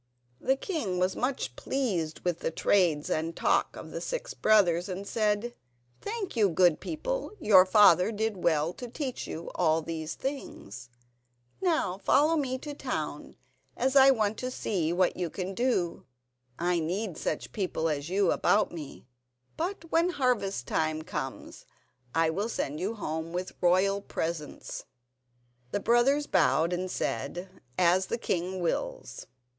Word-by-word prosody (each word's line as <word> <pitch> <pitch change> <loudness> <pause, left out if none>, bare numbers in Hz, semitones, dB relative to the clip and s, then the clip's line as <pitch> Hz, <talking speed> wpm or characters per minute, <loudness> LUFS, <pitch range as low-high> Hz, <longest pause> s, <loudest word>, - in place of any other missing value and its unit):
The 265 - +2
king 270 - -3
was 185 +1 +1
much 255 +2 -2
pleased 185 - -2
with 175 -2 -1
the - - -1
trades 165 -3 +2
and 165 +1 -1
talk - - +1
of - - -9
the - - -5
six - - -4
brothers, 185 -4 +3
and 190 +2 -4
said: 215 +2 0 0.5
"Thank 415 - -4
you, 210 -4 +4
good 175 -2 +4
people; - - -3
your 190 -3 +6
father 185 -1 +6
did 220 -1 -1
well 160 0 +2
to 245 - -7
teach 255 +1 -4
you 165 +2 -6
all 160 -2 +2
these 160 -1 -4
things. 130 - -6 0.7
Now 315 - +1
follow 295 +10 +3
me 265 -4 -1
to 295 - -9
the - - -8
town, - - -4 0.4
as 260 +2 +1
I 270 0 +8
want 220 -5 +1
to 255 - -2
see 185 -10 -1
what 180 +1 +2
you 180 -2 -2
can 185 +3 -4
do. 190 - -1 0.5
I 175 0 +1
need 180 +3 -2
such 155 - -3
people 185 -5 -1
as 150 0 -2
you 195 0 +2
about 200 +4 +2
me; 155 -7 -9 0.5
but 335 -1 -4
when 335 +2 +3
harvest 245 - 0
time 155 0 -1
comes - - -6 0.5
I 165 0 +3
will 200 +7 -2
send 150 -8 -3
you 200 +6 -2
home 160 -4 -4
with 180 +1 -3
royal 190 +3 +3
presents." 160 -5 -5 0.8
The 205 - -1
brothers 240 +7 +3
bowed 160 - +2
and 185 +1 -2
said: 185 +1 -4 0.2
"As 180 +1 +3
the - - -1
king 185 -4 -2
wills." - - -3
190 Hz, 150 wpm, -29 LUFS, 170-250 Hz, 0.8 s, I